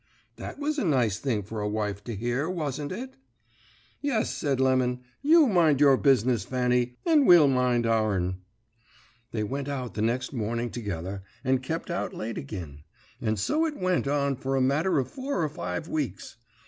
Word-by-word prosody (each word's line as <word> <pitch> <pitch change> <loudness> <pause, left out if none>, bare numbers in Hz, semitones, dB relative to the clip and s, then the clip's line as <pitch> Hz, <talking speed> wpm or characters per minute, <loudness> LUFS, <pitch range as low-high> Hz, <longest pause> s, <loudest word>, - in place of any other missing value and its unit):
"That - - -7
was 295 +1 -1
a - - 0
nice 125 - +1
thing 115 -7 -1
for 110 +2 -5
a 105 - -1
wife 105 -2 -2
to 115 - -4
hear, 120 - -1
wasn't 150 -5 -3
it? 250 +8 -6 0.8
"'Yes,' 270 -6 0
said 140 -3 -1
Lemon: 130 -1 +2 0.2
'you 310 +2 +6
mind 170 - +3
your 140 -2 +6
business, 125 -4 +3
Fanny, 125 -1 0
and 310 -5 +4
we'll 170 -5 +8
mind 125 -3 +2
our'n.' 105 -5 +1 0.9
"They 110 -2 -2
went 135 +5 -3
out 130 -5 -4
the 105 - -3
next 120 +5 -1
morning 115 0 -2
together, 95 -4 -4 0.2
and 130 0 +2
kep 165 +6 -4
out 175 - -3
late 115 +1 -4
agin; 85 - -7 0.4
and 110 -3 0
so 305 - +1
it 305 - -5
went 185 -5 0
on 140 -1 +1
for 135 0 -2
a - - +2
matter 150 +8 +2
of 130 -2 +1
four 265 - -3
or 155 - 0
five 90 -9 -4
weeks. 145 -6 -4
130 Hz, 175 wpm, -27 LUFS, 110-155 Hz, 0.9 s, we'll